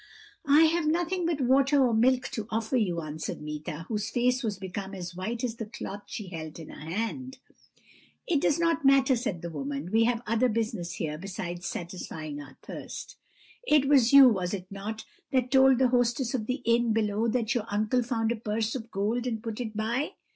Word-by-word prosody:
"'I 290 +2 +7
have 325 0 +2
nothing 345 +2 0
but 320 -4 -1
water 270 +2 +4
or 240 - +1
milk 250 +3 +3
to 220 -2 -5
offer 225 +3 -1
you,' 180 -8 +1
answered 155 0 -5
Meeta, 150 +1 -6
whose 210 -1 -2
face 250 +1 +1
was 215 -5 -2
become 195 +1 -6
as 180 -1 -7
white 225 +7 -4
as 235 -2 -2
the 225 - -5
cloth 205 -2 -7
she 210 -3 -6
held 160 -3 -7
in 160 -2 -9
her 155 - -9
hand. 240 +7 -3 0.9
"'It 310 -5 +1
does 295 - +2
not 335 -3 +1
matter,' 270 -1 +5
said 215 -9 -3
the 170 - -4
woman; 145 +2 -4
'we 225 +1 +4
have 240 0 0
other 230 +3 +2
business 215 -6 -2
here 155 -2 -4
besides 180 -1 -5
satisfying 160 -4 -6
our 135 -2 -13
thirst; - - -8 0.5
it 295 -2 +4
was 265 -5 +5
you, 280 -1 +10
was 190 -5 +1
it 185 -2 -7
not, 210 +3 -6 0.3
that 255 -2 +1
told 265 -1 +6
the 260 0 +3
hostess 245 +1 +1
of 225 -4 -2
the 255 +1 -2
inn 235 0 +3
below 215 0 +1
that 230 +1 0
your 235 -4 -1
uncle 215 +5 +1
found 230 -2 0
a - - 0
purse 220 0 -2
of 235 -3 -6
gold 225 +5 -1
and 225 -2 -3
put 225 +1 -4
it 220 -3 -5
by? 235 +7 -1
225 Hz, 200 wpm, -28 LUFS, 190-255 Hz, 0.9 s, you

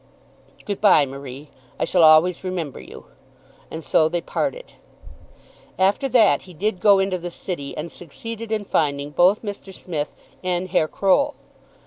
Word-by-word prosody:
"Good 205 -2 -4
bye, 185 -8 +6
Marie. 140 +1 -9 0.3
I - - +1
shall 180 - +2
always 160 +3 +5
remember 175 -7 -4
you." - - -12 0.6
And 160 0 -7
so 155 +1 +3
they 175 +1 -1
parted. - - -4 1.0
After 200 +9 +2
that 220 - +4
he 180 -2 -14
did 200 +3 -1
go 200 0 +5
into 190 -1 0
the 175 +1 -5
City, 170 -5 -6
and 160 +2 -5
succeeded 225 +7 -8
in 215 -2 -1
finding 145 -4 0
both 185 +8 +3
Mr. 205 -2 -7
Smith 160 -5 -5 0.3
and 180 0 -1
Herr 170 -3 +2
Croll. 280 - +1
180 Hz, 150 wpm, -22 LUFS, 155-200 Hz, 1.0 s, bye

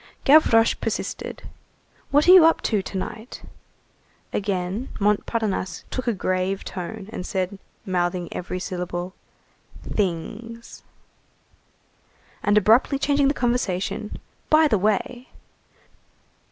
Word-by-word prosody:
Gavroche 250 -6 +6
persisted:— - - -4 0.7
"What 290 +3 +3
are - - +9
you 370 -2 +10
up 325 0 +4
to 210 -3 +1
to 190 - -6
night?" 220 +5 -7 0.9
Again 195 +3 -2
Montparnasse 210 -2 -1
took 255 -1 -4
a 235 - +2
grave 185 0 -1
tone, 195 +2 -6
and - - -4
said, 190 +1 -3 0.3
mouthing 175 -2 -1
every 180 +1 -4
syllable: 180 0 -4 0.7
"Things." 215 +5 -4 1.6
And 205 0 +3
abruptly 225 +7 +4
changing 280 0 +2
the 280 - +1
conversation:— 215 -4 -1 0.3
"By 310 0 +6
the 215 -8 +2
way!" 215 +5 -1
210 Hz, 105 wpm, -23 LUFS, 185-240 Hz, 1.6 s, you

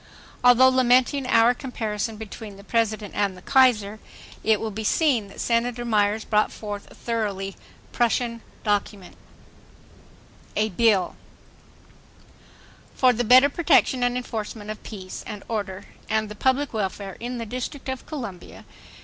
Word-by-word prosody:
Although 245 +1 +7
lamenting 255 +1 +3
our 230 0 +5
comparison 225 -4 -4
between 215 -1 -9
the 200 - -13
President 215 -2 -1
and 200 -2 -1
the - - -13
Kaiser, 220 -6 +3 0.4
it 220 -2 +3
will 220 - -3
be 220 +2 -5
seen 245 -3 +2
that 195 - -13
Senator 240 +1 0
Myers 215 -1 +1
brought 210 0 +2
forth 205 -2 -7
a - - -16
thoroughly 200 -4 -3 0.4
Prussian 235 -1 0 0.2
document: 205 -3 -2 1.4
A 215 +1 +1
BILL 205 -2 +2 1.8
For 255 -1 +4
the 245 +1 -1
better 255 +4 +7
protection 285 -5 +3
and 245 0 +1
enforcement 220 -3 -5
of 215 - -8
peace 190 -4 -8
and 210 -2 -7
order 200 -3 -4 0.3
and 220 -1 0
the 210 - -8
public 265 +5 +1
welfare 195 -2 -3
in 245 +1 -4
the 230 - -4
District 255 +5 -6
of 260 -1 -5
Columbia. 235 - -8
225 Hz, 140 wpm, -24 LUFS, 205-245 Hz, 1.8 s, Although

